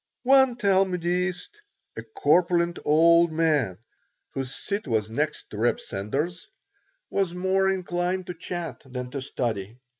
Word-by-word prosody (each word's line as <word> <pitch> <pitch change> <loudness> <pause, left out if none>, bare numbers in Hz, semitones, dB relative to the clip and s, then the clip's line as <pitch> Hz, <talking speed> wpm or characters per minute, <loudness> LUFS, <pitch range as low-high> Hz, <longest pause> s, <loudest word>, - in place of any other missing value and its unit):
One 265 -1 +5
Talmudist, 185 - 0 0.3
a - - -5
corpulent 175 - +1
old 170 +2 +5
man 150 - +1 0.5
whose 135 -2 -4
seat 200 -4 -3
was 110 -3 0
next 150 +6 -2
to 105 - -7
Reb 120 +3 +1
Sender's, 145 - -4 0.6
was 190 -3 0
more 190 +1 +2
inclined 180 0 -1
to 180 - -5
chat 175 0 -6
than 125 -2 -6
to 140 - -4
study. 115 -5 -3
170 Hz, 125 wpm, -26 LUFS, 135-185 Hz, 0.6 s, One